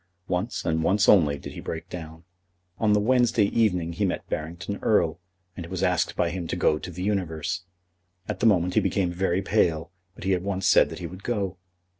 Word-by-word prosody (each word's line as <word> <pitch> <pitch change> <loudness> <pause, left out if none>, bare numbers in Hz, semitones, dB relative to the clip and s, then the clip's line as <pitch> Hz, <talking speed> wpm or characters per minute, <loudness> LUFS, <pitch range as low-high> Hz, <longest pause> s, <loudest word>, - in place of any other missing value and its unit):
Once, 95 +5 -2
and 80 0 +1
once 100 +5 +2
only, 75 -8 +5
did - - -9
he - - -8
break 80 - -5
down. 80 -1 -8 0.6
On 105 -2 +3
the 105 - +4
Wednesday 120 0 +3
evening 90 -7 +2
he 85 - -2
met 95 - -1
Barrington 85 +6 -4
Erle, 85 -6 +2 0.4
and 85 - -7
was 95 +1 -3
asked 90 -3 +1
by 85 - +1
him 85 -1 -4
to - - -2
go 75 - +2
to - - -7
The 90 +1 -6
Universe. 90 -3 -2 0.6
At 105 -3 -4
the 115 - +4
moment 90 -4 +3
he - - +4
became 95 -3 0
very 90 +1 0
pale, 85 -6 +1 0.2
but - - -11
he 95 - +2
at 90 - 0
once 95 0 -2
said - - +5
that - - -7
he 90 - -6
would 90 +3 -8
go. 100 -5 -2
90 Hz, 210 wpm, -26 LUFS, 85-100 Hz, 0.6 s, only